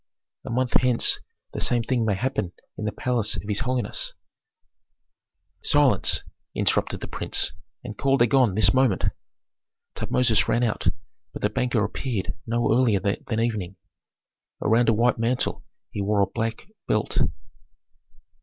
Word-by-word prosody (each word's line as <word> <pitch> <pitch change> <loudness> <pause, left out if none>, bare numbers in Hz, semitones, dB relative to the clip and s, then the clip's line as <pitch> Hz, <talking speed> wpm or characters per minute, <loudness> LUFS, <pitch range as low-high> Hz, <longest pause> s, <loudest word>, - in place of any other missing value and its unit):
A - - -6
month 125 +1 0
hence 125 -2 +3 0.3
the - - -4
same 120 -1 +2
thing 120 -1 0
may 105 -3 +1
happen 95 -5 -2 0.2
in 105 - -5
the 105 - 0
palace 120 -3 -1
of - - -5
his 105 -1 0
holiness 125 -4 -2 0.7
" - - -53 0.7
"Silence!" 145 -3 +3 0.3
interrupted - - +1
the - - -5
prince, - - 0 0.3
"and 105 - -7
call 135 +5 +2
Dagon 120 -4 +3
this 105 0 +5
moment." 130 -7 +2 0.9
Tutmosis 115 -4 +2
ran 120 - +2
out, 115 -3 -1 0.5
but - - -7
the - - +2
banker 125 -4 +1
appeared 110 0 -3
no 120 +1 +1
earlier 115 -5 +3
than 100 +3 -2
evening. 105 -5 -1 0.8
Around 115 +2 +3
a - - +5
white 120 +2 +2
mantle 120 +2 0 0.3
he 100 - -3
wore 100 +1 +2
a - - +5
black 115 +2 -3 0.2
belt. 105 - 0
115 Hz, 145 wpm, -25 LUFS, 105-125 Hz, 0.9 s, this